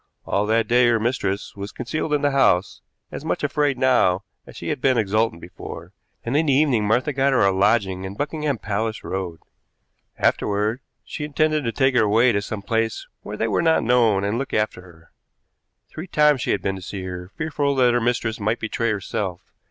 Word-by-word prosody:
All 105 +1 0
that 110 0 +2
day 120 +1 +4
her 115 -1 +3
mistress 105 -4 -2
was 100 +2 -6
concealed 155 0 -4
in 150 -1 +1
the 145 - +3
house, 100 -10 +2 0.3
as - - -7
much 160 - -2
afraid 145 -1 +1
now 125 -8 +3 0.2
as - - -12
she - - -5
had - - -2
been 130 -2 +3
exultant 110 -4 0
before, 85 0 -9 0.3
and 120 +4 -2
in 155 +1 +2
the 140 - +4
evening 130 -7 +2
Martha 125 +7 +1
got 135 0 +2
her 130 - +4
a 100 - +4
lodging 95 -1 +1
in 95 +1 -6
Buckingham 150 +1 -2
Palace 110 +2 -3
Road. 90 -4 -4 0.8
Afterward 105 +4 0 0.2
she 150 - -6
intended 155 +1 +1
to 115 - 0
take 135 +1 +2
her 125 - +4
away 115 +4 +4
to 100 -2 0
some 100 0 -6
place 115 +1 -1 0.2
where 105 +1 -7
they 110 - 0
were 110 - +1
not 160 -1 +3
known 115 -5 +3
and 105 +4 -1
look 135 - -3
after 105 -3 -1
her. 85 -3 -18 0.8
Three 160 +4 -7
times 150 -5 +3
she - - -3
had - - 0
been 95 0 -1
to - - -9
see 95 +1 -6
her, 90 -1 -6
fearful 145 -3 -1
that 125 -2 +4
her 120 - +2
mistress 115 -1 -1
might 110 +3 -1
betray 115 +1 -1
herself. 95 -3 -4
115 Hz, 205 wpm, -22 LUFS, 100-135 Hz, 0.8 s, day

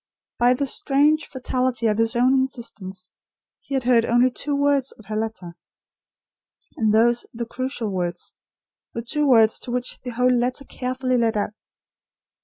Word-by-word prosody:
By 245 +1 +4
the 280 - -1
strange 290 +3 +2
fatality 255 -2 -1
of 215 -1 +1
his 225 +1 +2
own 250 +2 +4
insistence, 215 -8 -2 0.5
he 275 - -6
had 265 - 0
heard 240 -2 +4
only 240 +2 +3
two 285 +3 -3
words 280 -2 +2
of 220 - -18
her 215 +1 -5
letter, 215 -6 -4 1.2
and 220 -2 +1
those 235 +2 +3
the 235 0 -3
crucial 245 -2 -3
words; 175 -2 -3 0.6
the 230 - -3
two 300 +5 0
words 225 -4 +5
to - - -8
which 245 0 -2
the 250 - -6
whole 250 +1 +2
letter 250 +3 -1
carefully 255 0 -2
led 225 -2 +1
up. 205 - -1
245 Hz, 160 wpm, -23 LUFS, 225-260 Hz, 1.2 s, words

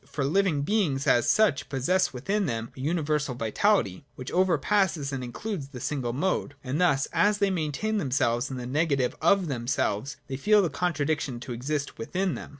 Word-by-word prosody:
For 140 -2 -2
living 165 -2 +2
beings 155 -8 0
as 120 -5 +3
such 215 -11 +2
possess 145 +8 +1
within 195 +11 -1
them 115 -1 -3
a - - -12
universal 150 -2 -1
vitality, 115 - +1
which 130 - -7
overpasses 180 -3 +1
and 130 -1 -3
includes 150 - -5
the 135 -3 -9
single 130 -3 -2
mode; 145 +1 -1
and 140 +6 -2
thus, 140 -6 +3
as 205 0 +3
they 200 -1 +2
maintain 180 +6 -1
themselves 125 - 0
in 130 - -5
the 125 - -5
negative 140 -1 0
of 190 +3 +4
themselves, 125 -1 -1
they 130 - -5
feel 210 +7 +4
the 175 - -1
contradiction 150 -6 -1
to 125 -1 -5
exist 140 +4 -3
within 185 +10 -1
them. - - -7
145 Hz, 175 wpm, -27 LUFS, 130-185 Hz, -, of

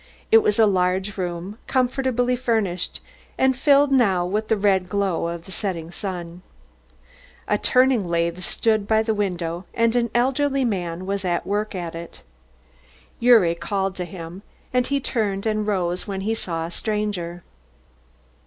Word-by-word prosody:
It 450 - +9
was 425 -1 +1
a 225 - +6
large 190 0 +1
room, 180 +3 -4
comfortably 250 -1 +1
furnished 220 -8 -1 0.4
and 265 0 +3
filled 280 +1 +4
now 200 -9 +3
with 210 +4 -1
the 220 - +2
red 190 -2 +2
glow 195 -5 0
of 170 0 -5
the - - -11
setting 175 -4 -3
sun. 175 -2 -6 1.1
A - - +1
turning 255 -6 +3
lathe 170 +1 0
stood 215 +3 0
by 220 0 +3
the 220 0 0
window 180 -4 -2
and 230 0 +2
an 235 -1 +2
elderly 270 +2 +2
man 180 -5 -2
was 200 0 -2
at 175 -2 -1
work 210 +1 -2
at 175 -2 -4
it. 170 0 -9 1.0
Gyuri 230 -8 +6
called 195 +2 -2
to 180 - -3
him 175 +1 -9 0.3
and 250 0 +2
he 280 0 +1
turned 210 -6 -2
and 215 -1 0
rose 180 -3 -1
when 195 -1 -3
he 215 +3 0
saw 165 -7 -3
a 170 - -7
stranger. 195 -5 -3
200 Hz, 155 wpm, -23 LUFS, 175-230 Hz, 1.1 s, It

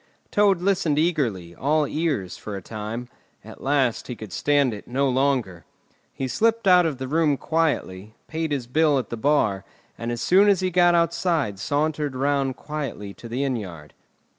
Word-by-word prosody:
Toad 200 -4 +3
listened 185 -6 +1
eagerly, 120 - 0
all 150 - +1
ears, 145 - -2
for 105 - -7
a 95 - -6
time; 110 +4 -6 0.4
at - - -12
last 135 -4 +1
he 125 - -5
could 110 -5 -9
stand 145 -4 +2
it 105 - -9
no 135 +3 0
longer. 130 - 0 0.5
He 135 - -4
slipped 225 - +1
out 180 -2 +6
of 150 -5 -3
the 130 0 -5
room 150 0 +2
quietly, 110 - -1
paid 160 -1 -3
his 135 -4 -1
bill 150 +3 +2
at 125 - -3
the - - -2
bar, 110 -7 +1 0.4
and 115 0 -3
as 120 - -3
soon 190 +11 +5
as 195 -3 +3
he 185 0 0
got 175 0 +4
outside 170 - 0
sauntered 145 +1 -1
round 135 0 0
quietly 140 -11 -6
to 115 - -11
the 125 +4 -2
inn 135 -2 0
yard. 85 -8 -9
140 Hz, 180 wpm, -24 LUFS, 115-160 Hz, 0.5 s, out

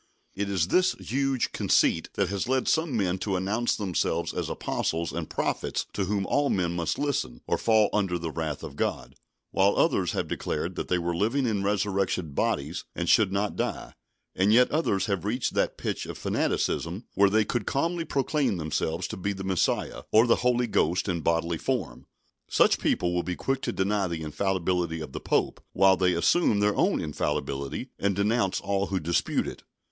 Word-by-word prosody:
It 100 0 -3
is 90 -3 0
this 185 0 +3
huge 135 0 -1
conceit 80 - +2
that 100 -3 +1
has 100 +4 -2
led 130 0 +1
some 160 -6 +1
men 95 -2 0
to 95 +1 -1
announce 105 +6 0
themselves 90 -4 -1
as - - -3
apostles 80 0 -2
and - - -4
prophets - - -2
to 100 - -1
whom 100 0 -1
all 145 +5 +1
men 90 -3 0
must 85 -2 -1
listen, 125 - -2
or - - 0
fall 110 -2 +4
under 95 -4 +1
the 85 -1 -4
wrath 80 -2 -4
of - - -7
God; - - -2 0.4
while 100 +1 +3
others - - +2
have - - -2
declared - - -3
that - - -4
they 90 - +1
were 85 0 -2
living 115 +9 +1
in 105 -4 0
resurrection 100 -4 0
bodies 75 +5 -1
and 85 - -2
should 105 -4 +5
not 100 +1 -1
die; - - -3 0.4
and 95 +3 +3
yet 125 +3 +5
others 120 - +1
have 100 -5 -1
reached 115 +5 -1
that - - 0
pitch - - -3
of - - -6
fanaticism 90 +8 -1
where 100 0 +4
they 110 +1 +3
could 115 -1 -2
calmly 165 +4 0
proclaim 135 - 0
themselves 80 +2 -2
to - - -6
be 100 +2 -2
the 95 0 -7
Messiah, 95 -3 0
or 110 +2 +6
the 120 - +4
Holy 125 0 +2
Ghost 90 -5 +1
in 85 -3 -1
bodily 85 0 0
form. 115 - -3 0.4
Such - - +4
people 90 0 +1
will 90 - +1
be 90 +1 -3
quick 135 +5 -1
to - - -2
deny 100 0 0
the 85 -2 -4
infallibility 85 +1 -1
of 75 -3 -7
the - - -5
Pope, - - 0
while 95 0 +5
they 90 -1 +2
assume 100 - +3
their 105 0 +2
own - - +2
infallibility, 70 -2 -3
and 100 -1 +1
denounce 100 0 +1
all 100 0 -1
who 95 -1 -1
dispute 85 +1 0
it. - - -7
95 Hz, 190 wpm, -27 LUFS, 85-110 Hz, 0.4 s, or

